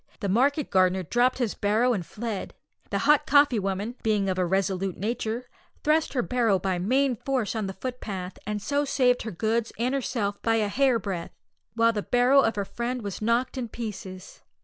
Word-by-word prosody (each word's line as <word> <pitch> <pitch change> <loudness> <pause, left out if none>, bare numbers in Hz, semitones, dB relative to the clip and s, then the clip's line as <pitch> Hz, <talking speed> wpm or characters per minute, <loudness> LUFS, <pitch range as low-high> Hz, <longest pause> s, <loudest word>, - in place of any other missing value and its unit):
The 200 - -2
market 275 +8 +2
gardener 185 -1 +3
dropt 240 +8 +2
his 240 -5 -1
barrow 220 +5 +2
and 195 -6 -2
fled. 215 +3 -5 0.3
The - - -1
hot 300 -1 +4
coffee 285 -5 +5
woman, 195 +4 -2
being 210 -3 +1
of 185 - -2
a 180 - +2
resolute 190 0 -1
nature, 225 +3 -3 0.4
thrust 310 +1 +2
her 250 -3 +1
barrow 230 -6 +2
by 185 -1 -1
main 255 +7 +2
force 255 -4 -1
on 215 -3 -2
the 190 - -5
footpath, 195 -5 -6
and 210 -1 -3
so 285 0 +1
saved 250 -3 +2
her 220 - -5
goods 225 +5 -1
and 245 +4 0
herself 230 -7 -2
by 225 -1 +2
a 215 -2 +1
hairbreadth, 220 -8 0 0.4
while 230 0 +4
the 210 - -1
barrow 250 +5 +4
of 225 - +1
her 200 -1 -2
friend 240 +3 -4
was 200 0 -5
knocked 235 +4 0
in 240 - -3
pieces. 200 -5 -8
225 Hz, 190 wpm, -26 LUFS, 195-250 Hz, 0.4 s, coffee